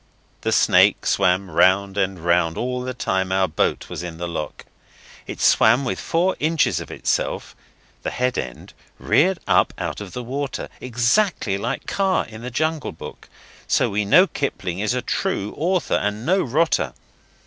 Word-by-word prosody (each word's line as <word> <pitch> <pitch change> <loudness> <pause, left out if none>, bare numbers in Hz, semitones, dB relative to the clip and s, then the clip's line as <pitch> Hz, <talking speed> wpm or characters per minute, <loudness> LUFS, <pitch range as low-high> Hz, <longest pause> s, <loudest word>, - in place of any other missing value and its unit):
The - - -1
snake - - +4
swam 90 +1 +1
round 95 +4 +3
and 95 -1 0
round 85 -1 +1
all 125 +1 -2
the 130 0 -5
time 95 -5 -1
our 95 0 +2
boat 80 - -1
was - - -6
in 85 -2 -7
the 85 +1 -4
lock. 80 -3 -6 0.6
It - - -7
swam 120 +5 +4
with 125 - -2
four 175 +3 0
inches 160 +1 +1
of - - -8
itself - - -2 0.5
the - - -3
head 125 0 -1
end 60 -1 -6 0.2
reared 185 +4 +2
up - - +2
out - - -4
of 100 -3 -8
the 125 - -5
water, 135 +3 -4
exactly 125 - +1
like 120 +6 -3
Kaa 195 -1 +1
in 110 0 -11
the 125 - -5
Jungle 155 +4 -1
Book - - -11 0.4
so - - +2
we 105 +1 0
know 140 - +6
Kipling 95 - -3
is 110 +4 0
a 125 - -2
true 125 - -2
author 175 -1 0
and 105 +3 -2
no 185 +4 +3
rotter. 130 - +1
115 Hz, 170 wpm, -22 LUFS, 95-145 Hz, 0.6 s, know